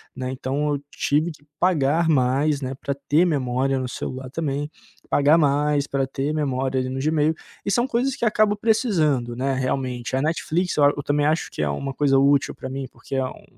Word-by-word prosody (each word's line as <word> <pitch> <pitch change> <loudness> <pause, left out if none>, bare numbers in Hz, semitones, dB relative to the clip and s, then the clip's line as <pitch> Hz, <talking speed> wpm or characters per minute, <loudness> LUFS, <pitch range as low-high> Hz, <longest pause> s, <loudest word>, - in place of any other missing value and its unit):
né. 130 0 -4
Então 135 +3 -2
eu 140 - -6
tive 150 +4 +1
que 145 -2 -16 0.2
pagar 165 -2 +2
mais, 140 +1 +2
né, 130 0 -3
pra 140 +1 -4
ter 160 +5 +5
memória 135 -4 0
no 130 -1 -3
celular 130 +1 -5
também, 145 -2 -3 0.4
pagar 145 +3 +4
mais 145 -1 +2
pra 135 -1 -1
ter 135 +3 -2
memória 135 -3 -1
ali 130 - -1
no 130 +1 -3
Gmail. 155 +1 +2 0.3
E - - -1
são 240 +4 +2
coisas 255 +2 0
que - - -8
acabo 215 -1 +3
precisando, 165 - +1
né, 135 +2 -1
realmente. 130 -1 -2
A 135 - +1
Netflix 165 +3 -1
eu 145 - +5
a 145 - +5
eu 145 - -5
também 145 +1 +1
acho 155 +2 0
que - - -4
é 75 - +1
uma 135 - -3
coisa 135 -1 +3
útil 140 0 +3
pra 130 - -7
mim, 135 0 -4
porque - - -8
é 130 -1 +1
um 130 - -9
140 Hz, 210 wpm, -23 LUFS, 130-155 Hz, 0.4 s, ter